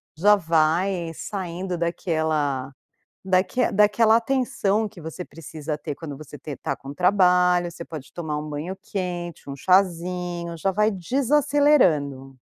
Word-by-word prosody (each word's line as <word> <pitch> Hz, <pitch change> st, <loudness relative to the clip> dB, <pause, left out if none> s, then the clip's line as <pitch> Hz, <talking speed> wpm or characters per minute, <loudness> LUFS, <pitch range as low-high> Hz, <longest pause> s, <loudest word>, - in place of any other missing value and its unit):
já 205 Hz, +7 st, +5 dB
vai 170 Hz, +1 st, +1 dB
saindo 185 Hz, -1 st, -4 dB
daquela 155 Hz, -5 st, -1 dB, 0.5 s
daque 190 Hz, +7 st, +2 dB
daquela 210 Hz, +2 st, +4 dB
atenção 230 Hz, -4 st, 0 dB
que 190 Hz, -, -14 dB
você 160 Hz, +3 st, -7 dB
precisa 155 Hz, -1 st, -6 dB
ter 150 Hz, -1 st, -5 dB
quando 145 Hz, -2 st, -8 dB
você 150 Hz, -1 st, -10 dB
te 145 Hz, -3 st, -7 dB
tá 140 Hz, -, -3 dB
com 135 Hz, +1 st, -9 dB
trabalho 180 Hz, 0 st, +3 dB
você 170 Hz, 0 st, -9 dB
pode 155 Hz, -4 st, -9 dB
tomar 160 Hz, -3 st, -4 dB
um 150 Hz, +1 st, -6 dB
banho 155 Hz, +6 st, -4 dB
quente, 175 Hz, -5 st, -5 dB
um 140 Hz, -, -4 dB
chazinho 175 Hz, 0 st, 0 dB
já 195 Hz, +4 st, 0 dB
vai 210 Hz, +3 st, +2 dB
desacelerando. 225 Hz, -, +2 dB
175 Hz, 135 wpm, -24 LUFS, 155-195 Hz, 0.5 s, já